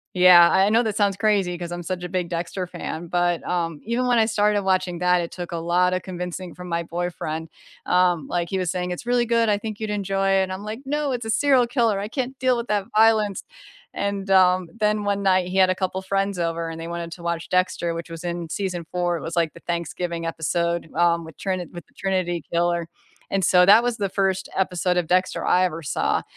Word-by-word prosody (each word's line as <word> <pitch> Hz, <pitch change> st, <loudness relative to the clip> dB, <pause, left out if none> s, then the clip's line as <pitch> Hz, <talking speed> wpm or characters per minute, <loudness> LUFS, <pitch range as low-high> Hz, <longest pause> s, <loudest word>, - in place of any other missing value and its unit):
Yeah, 180 Hz, -1 st, +8 dB
I 190 Hz, +1 st, +4 dB
know 230 Hz, +3 st, +3 dB
that 215 Hz, -2 st, -2 dB
sounds 200 Hz, -2 st, +2 dB
crazy 200 Hz, -4 st, +1 dB
'cause 175 Hz, 0 st, -6 dB
I'm 175 Hz, 0 st, -5 dB
such 180 Hz, +1 st, -4 dB
a 180 Hz, -, -4 dB
big 180 Hz, -1 st, -2 dB
Dexter 175 Hz, +2 st, -3 dB
fan, 175 Hz, -1 st, -6 dB
but, 175 Hz, 0 st, +1 dB
um, 165 Hz, -3 st, -2 dB
even 240 Hz, +3 st, 0 dB
when 245 Hz, -1 st, +3 dB
I 220 Hz, -, +4 dB
started 210 Hz, -2 st, +2 dB
watching 185 Hz, -2 st, 0 dB
that, 180 Hz, 0 st, +3 dB
it 170 Hz, -, -5 dB
took 175 Hz, -1 st, -7 dB
a -, -, -2 dB
lotta 180 Hz, +2 st, +1 dB
convincing 180 Hz, -1 st, -6 dB
from 180 Hz, 0 st, -9 dB
my 170 Hz, 0 st, -1 dB
boyfriend. 165 Hz, -2 st, -4 dB, 0.4 s
Um, 180 Hz, -3 st, +2 dB
like 170 Hz, -1 st, -2 dB
he 190 Hz, -, -1 dB
was 180 Hz, -2 st, -1 dB
saying, 180 Hz, -1 st, -3 dB
"It's 180 Hz, +6 st, -6 dB
really 245 Hz, 0 st, +2 dB
good, 230 Hz, -1 st, +2 dB
I 205 Hz, -, +3 dB
think 215 Hz, -1 st, -6 dB
you'd 215 Hz, -1 st, -4 dB
enjoy 195 Hz, -1 st, 0 dB
it," 190 Hz, -1 st, +2 dB
I'm 190 Hz, +2 st, -5 dB
like, 220 Hz, +4 st, -6 dB
"No, 290 Hz, 0 st, -1 dB
it's 240 Hz, -1 st, -3 dB
a -, -, -4 dB
serial 265 Hz, +1 st, +4 dB
killer, 230 Hz, -4 st, +1 dB
I 205 Hz, +1 st, -4 dB
can't 260 Hz, +1 st, -3 dB
deal 255 Hz, -1 st, +2 dB
with 235 Hz, 0 st, -4 dB
that 205 Hz, -2 st, 0 dB
violence," 215 Hz, -2 st, +3 dB, 0.5 s
and, 200 Hz, -1 st, -3 dB
um, 185 Hz, -1 st, +4 dB
then 210 Hz, -1 st, +1 dB
one 200 Hz, 0 st, 0 dB
night 185 Hz, -2 st, +3 dB
he 185 Hz, -, -5 dB
had 190 Hz, -1 st, +5 dB
a -, -, -1 dB
couple 185 Hz, 0 st, -2 dB
friends 195 Hz, 0 st, -1 dB
over 165 Hz, -1 st, -2 dB
and 165 Hz, -, -7 dB
they 165 Hz, -, -6 dB
wanted 170 Hz, 0 st, -5 dB
to 170 Hz, -, -12 dB
watch 170 Hz, -1 st, -3 dB
Dexter, 180 Hz, -2 st, 0 dB
which 165 Hz, +1 st, -6 dB
was 165 Hz, 0 st, -8 dB
in 170 Hz, -1 st, -4 dB
season 180 Hz, -2 st, -3 dB
4, 175 Hz, -1 st, 0 dB
it -, -, -8 dB
was, 165 Hz, +1 st, -6 dB
like, 165 Hz, -3 st, +1 dB
the -, -, -14 dB
Thanksgiving 170 Hz, 0 st, -3 dB
episode, 170 Hz, +1 st, -1 dB
um, 170 Hz, 0 st, +2 dB
with 160 Hz, -, -13 dB
Trini 185 Hz, -3 st, -3 dB
with 175 Hz, -, -9 dB
the -, -, -30 dB
Trinity 185 Hz, -4 st, -1 dB
Killer, 170 Hz, -1 st, 0 dB, 0.4 s
and, 195 Hz, -2 st, +2 dB
so 180 Hz, +2 st, +5 dB
that 205 Hz, +4 st, +8 dB
was 245 Hz, -1 st, 0 dB
the 200 Hz, -2 st, -1 dB
1st 190 Hz, -1 st, -1 dB
episode 180 Hz, -1 st, 0 dB
of 175 Hz, -2 st, 0 dB
Dexter 185 Hz, +2 st, +1 dB
I 180 Hz, -, +4 dB
ever 165 Hz, -2 st, -3 dB
saw, -, -, 0 dB
185 Hz, 230 wpm, -23 LUFS, 170-200 Hz, 0.5 s, Yeah